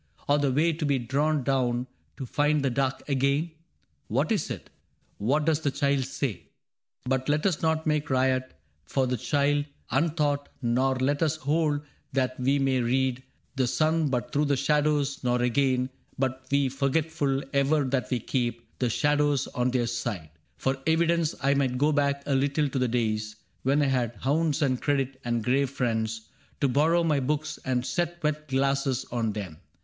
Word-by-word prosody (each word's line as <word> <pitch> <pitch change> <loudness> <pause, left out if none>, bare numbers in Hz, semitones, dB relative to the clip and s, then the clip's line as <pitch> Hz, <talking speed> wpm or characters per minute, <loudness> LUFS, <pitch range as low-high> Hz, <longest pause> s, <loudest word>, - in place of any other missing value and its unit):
Or 145 +1 +3
the 140 -2 +2
way 160 +5 +2
to 155 +1 -4
be 140 -2 +2
drawn 140 +4 0
down 125 -2 +1 0.3
to 135 - -5
find 145 +2 +1
the 135 - +1
dark 135 +1 -1
Again? 140 +4 +1 0.6
What - - 0
is - - 0
it? - - -7 0.5
What 140 +9 +1
does 160 -1 +2
the 145 - +1
child 140 -1 +1
say? 130 -2 -2
^^ 85 - -19 0.6
But 130 +1 0
let 150 +1 +1
us 185 -6 +1
not 160 -1 +1
make 150 -1 0
riot 130 0 +1 0.3
for 135 -1 0
the 125 0 0
child 145 +4 +1 0.3
Untaught, 145 0 +1
nor 130 +1 +1
let 135 +3 0
us 160 -2 +2
hold 150 0 0 0.3
that 130 -1 0
we 135 +3 +2
may 135 -2 +2
read 130 +1 +1 0.4
The 130 -2 +2
sun 155 +4 +2
but 125 -3 -2
through 145 +1 +2
the 140 -1 +1
shadows; 145 0 +1
nor, 125 0 +1
again, 130 +1 +1 0.3
Be 135 -1 +2 0.2
we 140 -1 +3
forgetful 140 +1 0
ever 140 +2 +3
that 130 -1 -1
we 125 - 0
keep 120 0 -3
The 125 - +1
shadows 145 +1 +2
on 125 -1 0
their 125 -1 +1
side. 105 -9 -4 0.3
For 135 0 0
evidence, 165 0 +2
I 140 +1 +4
might 135 -3 +1
go 145 +4 +3
back 140 -1 +1
a 140 - 0
little 140 +2 +2
to 135 - -2
the 125 - +2
days 110 -2 -1 0.3
When 140 +3 +2
I - - +2
had 125 -4 0
hounds 150 +6 +1
and 130 -3 +1
credit, 135 -2 -1
and 120 -2 -1
grave 135 +3 +2
friends 110 -4 -2 0.3
To 140 - +4
borrow 160 +6 +3
my 155 -4 +2
books 150 +3 -2
and 125 -1 0
set 175 +1 -2
wet 155 0 -1
glasses 135 -1 0
on 115 -3 -1
them. 95 -7 -6
135 Hz, 180 wpm, -27 LUFS, 125-150 Hz, 0.6 s, I